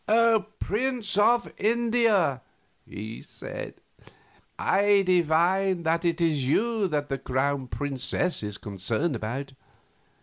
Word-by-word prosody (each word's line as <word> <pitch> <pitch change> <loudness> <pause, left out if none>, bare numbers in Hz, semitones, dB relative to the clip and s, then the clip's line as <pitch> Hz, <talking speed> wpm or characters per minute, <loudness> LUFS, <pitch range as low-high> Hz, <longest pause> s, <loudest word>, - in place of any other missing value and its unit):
"Prince 245 0 -2
of 235 +4 +3
India," 225 - +2 0.5
he 110 +2 -7
said, - - -8 0.8
"I 200 0 +3
divine 180 +1 +2
that 165 +1 +1
it 170 -1 0
is 155 -6 +1
you 220 - +1
that 150 -3 -2
the 135 -1 -2
Crown 130 +1 -1
Princess 145 +6 -2
is 105 -1 -5
concerned 110 - -1
about. 130 +5 -5
165 Hz, 105 wpm, -26 LUFS, 135-205 Hz, 0.8 s, of